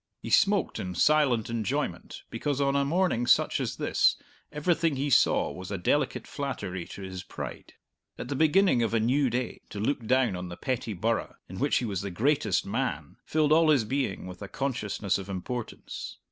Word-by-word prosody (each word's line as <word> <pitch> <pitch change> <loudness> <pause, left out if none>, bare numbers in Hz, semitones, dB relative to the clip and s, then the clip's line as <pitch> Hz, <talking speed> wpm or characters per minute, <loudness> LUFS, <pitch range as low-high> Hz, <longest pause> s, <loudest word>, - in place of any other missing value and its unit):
He - - -7
smoked 200 -5 +3
in 90 -1 -4
silent 140 - +3
enjoyment 115 -3 -3
because 145 -2 -2
on 140 0 +2
a 140 - +3
morning 155 -5 +1
such - - +4
as - - -2
this - - +2 0.4
everything 160 +1 +1
he 140 +2 -1
saw 110 - +4
was 90 +4 -8
a 100 - -2
delicate 95 +12 0
flattery 110 - -4
to 100 - -9
his 95 -1 -6
pride. - - -8 0.4
At - - -6
the 140 - -3
beginning 160 -1 +4
of 115 0 0
a - - +3
new 130 +5 +2
day, 120 +1 -3
to 105 - -6
look 115 +1 -1
down 130 -5 +3
on 90 0 -5
the 85 - -8
petty 125 -4 -2
burgh 110 +5 -1
in 95 - -8
which 140 +1 +2
he 125 - -1
was 100 -5 -2
the 100 - -4
greatest 110 - +1
man - - -3
filled 155 -1 +1
all 160 0 +5
his 140 -6 +4
being 125 -5 -2
with 90 -1 -9
a - - -5
consciousness 105 -8 -2
of 100 - -8
importance. 110 +5 -6
125 Hz, 190 wpm, -28 LUFS, 100-145 Hz, 0.4 s, all